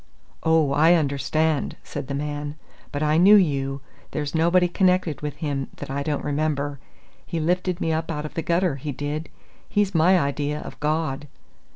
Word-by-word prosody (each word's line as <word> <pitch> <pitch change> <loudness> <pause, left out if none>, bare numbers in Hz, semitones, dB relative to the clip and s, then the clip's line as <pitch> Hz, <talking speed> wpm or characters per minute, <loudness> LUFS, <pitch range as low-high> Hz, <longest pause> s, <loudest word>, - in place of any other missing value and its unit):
"Oh, 160 -3 +3
I 160 +5 +5
understand," 155 0 0
said 140 -2 -6
the 140 - -3
man. 145 0 -4 0.4
"But 145 +1 -2
I 155 +1 +3
knew 195 +5 +8
you! 140 -7 +2 0.3
There's 145 -1 -3
nobody 170 +2 +4
connected 180 -3 +1
with 150 -2 -4
him 140 -3 -3
that - - -7
I 140 +1 -2
don't 145 0 -2
remember. 145 -1 -1 0.4
He 170 - -4
lifted 180 +2 0
me 160 -3 0
up 160 +1 -2
out 150 -2 -3
of 150 - -7
the 165 - -2
gutter, 170 -2 +1
he 145 +2 -4
did. 145 +4 -4 0.4
He's 205 -1 +1
my 175 +3 +5
idea 145 0 -1
of - - -9
God!" 150 -2 -1
150 Hz, 175 wpm, -24 LUFS, 145-165 Hz, 0.4 s, knew